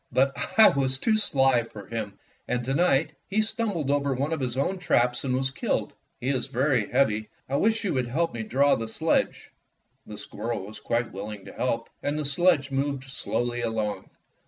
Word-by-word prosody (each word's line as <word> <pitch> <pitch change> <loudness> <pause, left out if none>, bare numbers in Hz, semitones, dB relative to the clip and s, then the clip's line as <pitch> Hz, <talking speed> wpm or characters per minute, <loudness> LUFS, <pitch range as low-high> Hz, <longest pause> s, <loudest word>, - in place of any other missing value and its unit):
But 135 +1 +3 0.3
I 220 - +9
was 135 -1 +3
too 220 - +2
sly 135 - +4
for 105 -3 -10
him, 110 -1 -5 0.3
and 125 -1 -1
to 135 - -1
night 155 -1 +2 0.2
he 200 +2 +1
stumbled 205 - -1
over 140 -1 +1
one 140 +5 -1
of 160 - -2
his 125 -2 -2
own 185 +8 0
traps 125 -8 +1
and 130 -2 0
was 130 0 0
killed. - - -2 0.3
He 125 - -2
is 130 -3 0
very 130 -4 +1
heavy. 110 -5 +1 0.2
I 140 - 0
wish 220 +4 +2
you 200 - 0
would 130 -3 0
help 165 +7 0
me 115 - -4
draw 140 +5 +3
the 115 - -1
sledge." 160 +8 0 0.6
The 105 - -8
squirrel 105 -1 -5
was 105 +2 -10
quite 115 0 -1
willing 100 +1 -7
to - - -10
help, 115 -2 -1
and 145 +1 -1
the 150 - -2
sledge 145 -1 +2
moved 135 0 -1
slowly 120 -2 -2
along. 110 -3 -2
130 Hz, 195 wpm, -26 LUFS, 115-145 Hz, 0.6 s, I